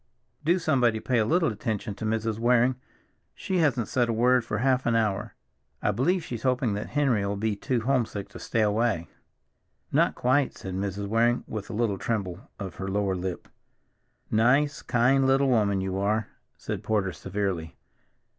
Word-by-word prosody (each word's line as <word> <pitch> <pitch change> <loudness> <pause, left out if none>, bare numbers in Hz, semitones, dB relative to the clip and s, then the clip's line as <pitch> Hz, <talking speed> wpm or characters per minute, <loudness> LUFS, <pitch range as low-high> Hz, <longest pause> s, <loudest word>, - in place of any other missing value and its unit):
Do 170 +4 +3
somebody 125 -10 +2
pay 125 +1 +1
a 110 - +2
little 165 +3 +2
attention 105 0 -3
to 105 - -6
Mrs. 110 0 -1
Waring; 125 +2 +3 0.6
she 190 - -2
hasn't 135 -8 +2
said 120 -2 +1
a - - +1
word 125 +2 +3
for 110 -2 -3
half 130 +2 +1
an 115 - +2
hour. 105 -4 0 0.4
I - - +1
believe 165 - +1
she's 120 -5 -6
hoping 125 -3 +1
that 105 +1 -4
Henry'll 115 -8 +1
be 105 +1 -1
too 125 +3 -1
homesick 115 -5 -1
to - - -10
stay 115 - -1
away." 105 -5 +1 0.8
"Not - - +2
quite," 130 +2 +1
said 95 - -6
Mrs. 100 +1 -3
Waring 115 +3 +2
with 110 -2 -6
a - - -5
little 105 -3 0
tremble 105 +1 -3
of 95 -4 -7
her 95 - -4
lower 100 -1 0
lip. 90 0 -4 0.8
"Nice, 135 +7 +3
kind 130 +2 +3
little 135 +1 +3
woman 105 -5 +2
you 95 0 -2
are," 105 +1 0 0.3
said - - -4
Porter 100 -4 0
severely. 95 -3 -3
110 Hz, 170 wpm, -27 LUFS, 100-125 Hz, 0.8 s, Do